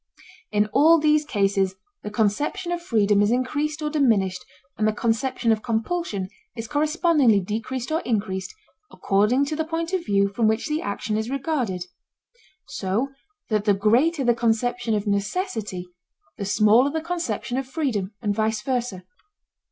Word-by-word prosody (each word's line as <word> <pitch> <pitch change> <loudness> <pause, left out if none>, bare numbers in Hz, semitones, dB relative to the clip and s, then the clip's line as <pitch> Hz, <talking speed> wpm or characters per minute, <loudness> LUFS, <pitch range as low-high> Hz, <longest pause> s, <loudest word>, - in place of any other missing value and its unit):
In 210 0 +3
all 320 +4 +6
these 305 -1 +3
cases 195 -7 +1 0.3
the - - -5
conception 220 - -1
of 350 0 -2
freedom 210 - +2
is 205 - +3
increased 290 +6 -1
or 300 - 0
diminished 210 -11 +2 0.3
and 215 - +1
the 215 - +2
conception 230 +1 0
of 220 -1 +1
compulsion 225 - -2 0.3
is 225 -1 -5
correspondingly 300 - +3
decreased 230 +7 -4
or 320 - +2
increased, 195 -4 -2 0.3
according 210 +8 +2
to 305 - -3
the 320 - 0
point 330 +2 -3
of 370 -2 0
view 200 -4 +2
from 215 +3 +1
which 220 +1 0
the 305 +1 -1
action 210 +1 -2
is 220 +2 -2
regarded. 260 - -2 0.8
So 205 +8 -2 0.4
that 210 -2 0
the 205 -2 +4
greater 255 +10 +2
the 240 -1 +4
conception 235 0 0
of 205 0 -2
necessity 205 - -2 0.5
the 200 - -5
smaller 215 +6 +4
the 320 +2 -2
conception 315 - -3
of 270 - -5
freedom 245 - -2
and 205 -2 +1
vice 220 0 -1
versa. 245 -7 -2
230 Hz, 155 wpm, -24 LUFS, 205-295 Hz, 0.8 s, all